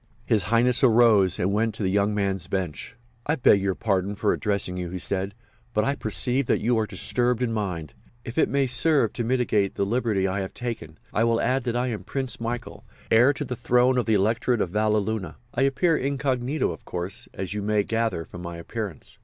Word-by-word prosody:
His 105 -6 +1
Highness 120 +2 +3
arose 110 -6 +5
and 95 +3 0
went 110 +1 0
to 110 - -3
the 95 - +1
young 100 +1 +1
man's 100 -3 -1
bench. 90 - -4 0.3
"I 150 - +2
beg 110 -7 +4
your 95 -1 0
pardon 100 -3 -1
for 105 0 +1
addressing 100 -4 -1
you," 90 -1 -4
he 90 - -5
said, 95 +2 -2 0.4
"but 105 - +3
I 140 - +1
perceive 125 +2 -1
that - - +2
you 120 +3 +1
are 110 - -1
disturbed 125 +2 +2
in 115 -2 -1
mind. 90 - -3 0.3
If 115 - -6
it - - +3
may 140 -1 +2
serve 130 -1 +2
to 120 - -2
mitigate 115 -5 +1
the 100 - 0
liberty 110 -3 0
I 95 +1 -2
have 95 0 -5
taken 110 -10 -5 0.2
I 115 - +2
will 115 0 +2
add 130 +1 0
that 120 -1 -1
I 125 +1 +1
am 105 -5 -4
Prince 130 +4 -4
Michael, 120 +1 -5 0.3
heir 120 +5 +6
to 140 - -4
the 125 - -4
throne 125 +1 +3
of 120 - -2
the 110 - +3
Electorate 115 +4 +1
of 90 - -1
Valleluna. 105 -3 0 0.2
I 120 - -1
appear 140 +5 +2
incognito, 135 - -1
of 80 - -9
course, 90 +2 -4
as 95 0 -4
you 105 - -3
may 105 0 +1
gather 115 -7 -1
from 90 - -10
my 85 -1 -6
appearance. 100 - -7
110 Hz, 210 wpm, -25 LUFS, 95-125 Hz, 0.4 s, heir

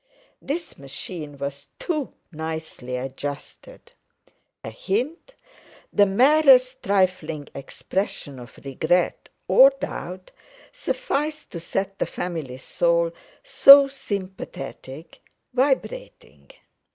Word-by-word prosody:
This 330 +5 -5
machine 145 +2 -7
was 140 0 -6
too 305 -6 -3 0.2
nicely 160 -5 -5
adjusted; 135 +2 -7 0.7
a 110 - -6
hint, 255 - -3 0.6
the 205 -1 +5
merest 260 +3 +5
trifling 180 -6 0
expression 140 -1 -4
of 120 -1 -13
regret 160 +6 0 0.2
or - - +8
doubt, 185 - -7 0.4
sufficed 310 - -3
to 170 - -6
set 195 +3 -3
the - - 0
family 160 -8 -5
soul 170 +4 +1 0.3
so 275 +1 +8
sympathetic—vibrating. 210 - -5
185 Hz, 85 wpm, -23 LUFS, -, 0.7 s, or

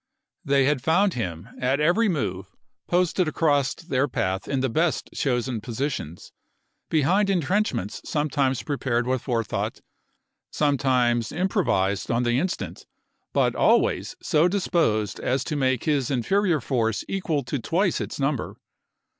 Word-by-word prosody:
They 140 -3 +3
had 145 -2 +1
found 185 +6 +3
him, 90 -8 -4
at 130 +3 +1
every 180 +9 +3
move, 95 - -2 0.4
posted 180 0 +2
across 145 -4 +1
their 145 -5 -1
path 95 -6 -2
in 135 -2 -1
the 130 - +1
best 160 +6 0
chosen 120 -3 -1
positions, 115 - -4 0.6
behind 180 +7 +2
intrenchments 175 - 0
sometimes 140 -4 0
pre 145 -2 -2
pared 120 -2 0
with 130 -1 0
forethought, 115 -4 -2 0.7
sometimes 125 -5 +1
improvised 165 - 0
on 120 +1 +1
the 120 +1 +2
instant, 185 +3 -4 0.4
but - - +2
always - - +2
so 160 +1 +3
disposed 165 - 0
as 130 +1 0
to 150 - -3
make 130 -3 +1
his 145 -5 +1
inferior 170 - +1
force 115 -5 -1
equal 165 -7 -1
to 130 +3 -3
twice 175 - 0
its - - -5
number. 135 -2 -1
140 Hz, 135 wpm, -25 LUFS, 120-165 Hz, 0.7 s, They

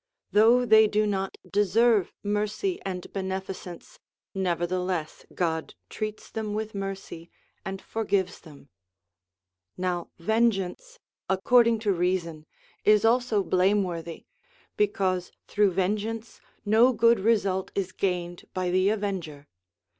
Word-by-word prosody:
Though 230 +4 +5
they 220 -1 +6
do 210 +1 +1
not 195 -2 -2
deserve 205 +1 +3
mercy 210 - -1
and 185 -2 -6
beneficence, 190 - -6 0.3
nevertheless 180 -2 -2
God 160 -2 -2 0.2
treats 215 -1 -5
them 215 -2 -3
with 220 0 -4
mercy 195 -4 -6 0.3
and 195 0 -5
forgives 200 -4 -1
them. 145 -3 -16 1.1
Now 180 -1 -2
vengeance, 220 - 0 0.3
according 230 +4 +4
to 205 -3 +1
reason, 170 -3 -2 0.4
is 210 0 +4
also 230 -3 +2
blame 190 +3 +2
worthy, 170 -2 -6 0.5
because 190 -3 0 0.2
through 205 -1 +3
vengeance 210 +5 -2 0.2
no 225 +5 +5
good 230 0 +4
result 195 -3 +1
is 190 -2 -2
gained 175 -3 -3
by 185 -1 -1
the 185 +2 +3
avenger. 185 -9 -3
195 Hz, 110 wpm, -26 LUFS, 180-215 Hz, 1.1 s, they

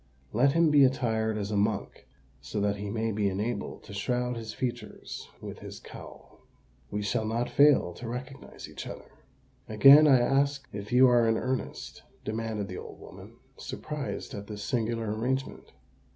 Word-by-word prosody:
Let 135 +5 +4
him 165 -1 +4
be 145 -2 +7
attired 110 -4 +1
as 105 0 -3
a - - -1
monk, 100 0 -1 0.3
so 70 +10 -4
that 100 0 0
he 100 0 -5
may 115 +1 -1
be 105 -1 0
enabled 105 +5 -3
to 100 - -11
shroud 125 +4 -1
his 110 -2 -6
features 125 +1 -5
with - - -8
his - - -9
cowl. - - -13 0.5
We 105 0 -3
shall 105 +2 0
not 115 +2 -2
fail 140 -11 +5
to 115 +4 -7
recognise 130 +3 -8
each - - -8
other." - - -9 0.6
"Again 140 +8 +8
I 135 -3 +6
ask 140 +2 +1
if 100 0 -7
you 130 +2 +7
are 120 -2 +4
in 110 0 +2
earnest?" 130 +2 -4 0.2
demanded 110 -2 -3
the 90 - -6
old - - -10
woman, - - -12 0.2
surprised 150 -2 -5
at 100 0 -7
this 105 -1 -6
singular 115 -2 -1
arrangement. 130 +4 -3
115 Hz, 165 wpm, -28 LUFS, 105-130 Hz, 0.6 s, Again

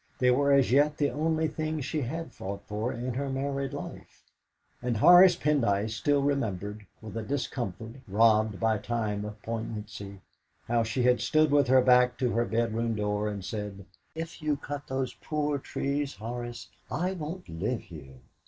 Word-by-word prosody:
They 125 -1 +4
were 140 +3 +3
as 140 -3 +4
yet 145 +3 +4
the 145 -1 +1
only 160 +1 0
things 155 -2 -3
she 155 +1 -2
had 160 +6 -4
fought 100 +1 -6
for 105 +4 -2
in 125 0 -4
her 140 +2 -2
married 135 0 -2
life, - - -9 0.6
and 120 -2 -1
Horace 175 - +8
Pendyce 115 - +1
still 140 +5 +1
remembered 105 -7 -2 0.2
with 110 - -8
a - - -1
discomfort 120 -2 -4
robbed 110 0 +3
by 110 -2 +2
time 105 -2 -2
of 105 0 -8
poignancy 105 -3 -6 0.5
how 120 0 +2
she 115 +3 -1
had 125 0 +4
stood 155 -1 +3
with 145 -1 +4
her 130 +1 +6
back 125 -1 +5
to 125 -2 +1
their 120 0 +1
bedroom 115 0 0
door 105 0 -1
and 100 -2 -5
said, 105 -3 -5 0.3
"If 165 +1 -6
you 150 -2 0
cut 145 0 -6
those 130 -1 -2
poor 150 -2 -2
trees, 140 +1 -2
Horace, 120 +1 -6 0.2
I 180 +2 -1
won't 175 +1 -6
live 105 +9 -2
here!" 70 -6 -12
125 Hz, 170 wpm, -28 LUFS, 110-145 Hz, 0.6 s, Horace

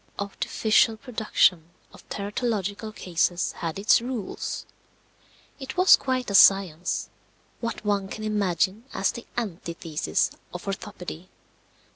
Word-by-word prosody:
The - - -1
artificial 220 +2 +2
production 215 -8 +1 0.2
of - - -17
teratological 210 0 -3
cases 175 0 0
had 165 -1 -5
its 205 +3 +4
rules. 240 -5 -4 0.9
It 265 +2 -7
was 365 +1 +8
quite 255 -4 -2
a - - -3
science 190 -4 +4 0.5
what 230 -2 -4
one 200 -2 +1
can 215 +2 -7
imagine 205 0 0
as - - +2
the 235 - -9
antithesis 170 -7 -2 0.2
of 180 - -6
orthopedy. 185 -3 -6
200 Hz, 115 wpm, -26 LUFS, 180-225 Hz, 0.9 s, was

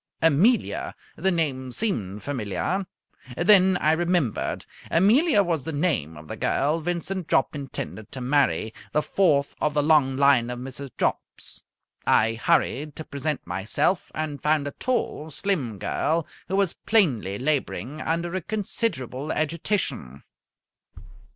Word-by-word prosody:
Amelia! 170 - +2 0.2
The 190 - +1
name 140 -7 -1
seemed 105 - -2
familiar. 140 - -2 0.5
Then 190 0 +5
I 155 - +2
remembered. 170 - 0 0.2
Amelia 210 - +4
was 165 -6 -1
the 160 - -4
name 145 - -1
of 75 +1 -12
the - - -5
girl 150 +4 +1
Vincent 175 +2 -3
Jopp - - +2
intended 135 -6 -6
to 135 - -5
marry, 125 - +1 0.2
the 150 - +2
fourth 150 -8 +2
of 150 -1 +1
the 145 - +3
long 145 -4 +4
line 140 -4 +4
of 125 - -4
Mrs. 135 +2 -7
Jopps. - - -3 0.5
I 115 +1 +4
hurried 150 +3 +1
to 160 - -6
present 145 +1 -3
myself, 95 - 0
and 155 -3 -3
found 150 -1 +2
a - - -3
tall, 235 - -2
slim 150 - -1
girl, 155 - 0 0.2
who 190 - -1
was 195 -3 +2
plainly 130 - +1
labouring 145 +1 -2
under 170 +2 -1
a 190 - -1
considerable 165 - -3
agitation. 155 - -2
150 Hz, 135 wpm, -25 LUFS, 130-175 Hz, 0.5 s, Then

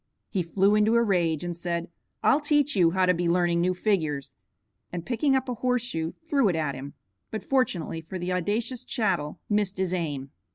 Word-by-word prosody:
He 195 - 0
flew 195 +4 +2
into 210 +2 +4
a 235 - +5
rage, 170 -7 +1
and 175 -1 -3
said, 170 0 -3 0.4
"I'll 285 - +5
teach 295 -1 +2
you 175 -3 +5
how 185 +2 +2
to 180 - +4
be 175 0 0
learning 170 -1 +2
new 185 +1 +1
figures," 160 -9 -1 0.6
and 175 -1 -5
picking 270 +3 +2
up 265 0 0
a 250 - -1
horse 250 0 0
shoe 165 -8 -3
threw 275 -8 +3
it 175 - 0
at 155 -3 -1
him, 135 +2 -8 0.3
but 220 - -5
fortunately 185 - 0
for 165 +4 -7
the 180 +1 -2
audacious 220 +7 -1
chattel, 185 -12 -1
missed 205 -2 0
his 185 -1 0
aim. 145 -6 -3
185 Hz, 200 wpm, -27 LUFS, 170-225 Hz, 0.6 s, a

